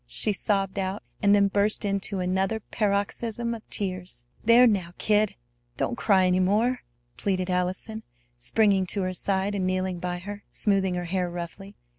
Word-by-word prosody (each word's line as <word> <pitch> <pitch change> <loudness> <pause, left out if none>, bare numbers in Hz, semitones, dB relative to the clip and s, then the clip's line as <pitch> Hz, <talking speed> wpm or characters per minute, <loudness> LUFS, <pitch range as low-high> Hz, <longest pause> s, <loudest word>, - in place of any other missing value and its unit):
she 205 - +3
sobbed 195 -1 0
out, 190 +1 -3 0.2
and 200 0 +5
then 200 -1 +4
burst 205 +2 +1
into 200 0 -1
another 190 +4 0
paroxysm 220 +3 -1
of 230 - -6
tears. 185 -10 -4 0.2
"There! 235 +3 +7
Now, 190 -7 +1
kid! 210 -1 +2 0.4
Don't 245 - -1
cry 195 -5 +3
any 180 0 +3
more!" 215 +7 +2 0.4
pleaded 185 -2 -1
Allison, 185 +5 -2 0.4
springing 195 - +2
to 200 +1 -2
her 185 0 -2
side 195 +2 -1
and 190 -2 -1
kneeling 185 -1 -1
by 180 0 -3
her, 205 +3 -8
smoothing 195 -3 +1
her 175 0 -3
hair 180 0 -1
roughly. 175 +4 -7
195 Hz, 160 wpm, -26 LUFS, 185-210 Hz, 0.4 s, There